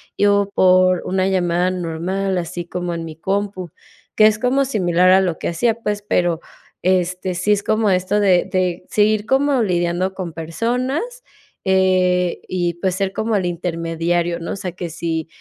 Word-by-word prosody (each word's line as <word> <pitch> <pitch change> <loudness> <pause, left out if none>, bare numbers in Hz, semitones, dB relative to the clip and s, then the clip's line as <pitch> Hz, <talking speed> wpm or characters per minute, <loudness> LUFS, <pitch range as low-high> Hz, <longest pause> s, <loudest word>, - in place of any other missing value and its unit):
y 205 - +3
o 200 0 +2
por 185 -1 +4
una 190 0 0
llamada 180 -1 +1
normal, 185 +2 -2
así 175 0 -4
como 175 0 -4
en 165 -1 -4
mi 160 -1 -8
compu, 190 0 -3 0.4
que 215 - +7
es 215 -1 +2
como 255 +4 +1
similar 185 -8 +2
a 190 +1 +6
lo 180 -4 -1
que - - -3
hacía, 225 +8 +1
pues, 205 -2 -2
pero 175 -4 +1 0.4
este, 185 0 0
sí 185 +4 +1
es 205 -1 -1
como 215 -1 +1
esto 185 +2 +1
de 190 -3 +3
de 185 -2 0
seguir 210 0 +2
como 265 0 +2
lidiando 175 0 0
con 185 -3 -5
personas, 250 - -3 0.4
eh, 185 -1 +2
y, 175 -2 -1
pues, 180 +2 -1
ser 190 +1 -1
como 220 +2 -1
el 190 -3 0
intermediario, 170 0 -1
¿no? 165 - -5
O - - -3
sea, 180 -3 -5
que 175 -1 -6
sí 160 -1 -3
185 Hz, 175 wpm, -19 LUFS, 175-205 Hz, 0.4 s, que